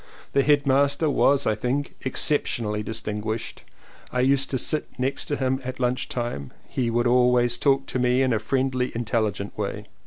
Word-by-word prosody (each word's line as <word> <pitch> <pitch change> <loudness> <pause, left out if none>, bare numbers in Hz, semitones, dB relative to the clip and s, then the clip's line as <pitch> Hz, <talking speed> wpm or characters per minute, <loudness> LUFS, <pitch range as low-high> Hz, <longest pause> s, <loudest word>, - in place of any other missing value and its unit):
The 140 - +4
headmaster 140 +1 +3
was 140 0 +3
I - - +2
think 125 +6 -2
exceptionally 120 -6 +1
distinguished, 110 0 -4 0.5
I 125 - 0
used 135 +1 +2
to 130 - 0
sit 150 +4 0
next 130 +1 -1
to 145 - -1
him 130 -1 -1
at 130 0 -6
lunch 125 0 -1
time 120 - -3
and 70 - -11 0.2
he 125 -3 -1
would 120 +1 +1
always 125 0 +3
talk 135 -1 +2
to 130 - -3
me 125 +1 +3
in 130 -2 +2
a 110 - +1
friendly 130 +2 -1
intelligent 110 -3 -2
way. - - -4
125 Hz, 175 wpm, -24 LUFS, 115-135 Hz, 0.5 s, The